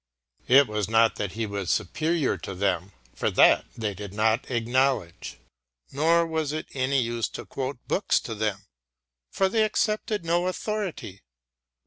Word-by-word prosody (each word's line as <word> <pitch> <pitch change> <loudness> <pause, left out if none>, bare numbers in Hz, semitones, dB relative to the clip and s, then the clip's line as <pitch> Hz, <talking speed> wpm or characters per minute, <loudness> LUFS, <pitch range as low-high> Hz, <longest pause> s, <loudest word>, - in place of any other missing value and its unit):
It 135 +3 +7
was 105 -1 -2
not 115 0 +3
that 100 -3 -3
he 115 0 -2
was 100 -3 -4
superior 160 -2 0
to 95 - -7
them, 95 -1 -1 0.2
for - - -1
that - - +5
they 110 -3 -2
did 100 0 -8
not 110 +3 +1
acknowledge, 120 - 0 0.5
nor 165 +4 +3
was 160 -3 -2
it 155 +1 -4
any 135 +1 +1
use 115 -1 -1
to - - -8
quote 135 0 -4
books 195 - +1
to 115 - -6
them, 105 -2 -2 0.7
for 195 - +1
they 220 +3 +1
accepted 215 -2 -1
no 175 +2 +1
authority. 185 - -4
130 Hz, 150 wpm, -26 LUFS, 105-165 Hz, 0.7 s, It